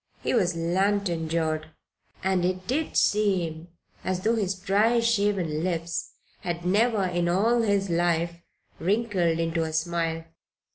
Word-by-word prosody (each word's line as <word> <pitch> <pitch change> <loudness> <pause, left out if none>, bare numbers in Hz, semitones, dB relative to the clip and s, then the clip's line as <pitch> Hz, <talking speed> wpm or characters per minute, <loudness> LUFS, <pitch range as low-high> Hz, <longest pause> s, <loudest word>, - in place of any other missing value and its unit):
He - - 0
was 180 -8 +2
lantern 175 0 0
jawed, 155 -1 -1 0.6
and 190 -1 +1
it 185 +1 -1
did 290 +6 -1
seem 180 -6 +1 0.4
as 185 -1 -1
though 225 +4 +2
his 195 -4 0
dry, 210 +5 +2
shaven 200 -9 +1
lips 170 -2 -2 0.3
had 175 -1 -4
never 210 +3 +2
in 175 -1 0
all 225 +7 +3
his 200 -3 +1
life 170 0 0 0.4
wrinkled 190 -3 +1
into 165 0 0
a 160 -1 -2
smile. 165 0 -1
180 Hz, 135 wpm, -26 LUFS, 165-205 Hz, 0.6 s, all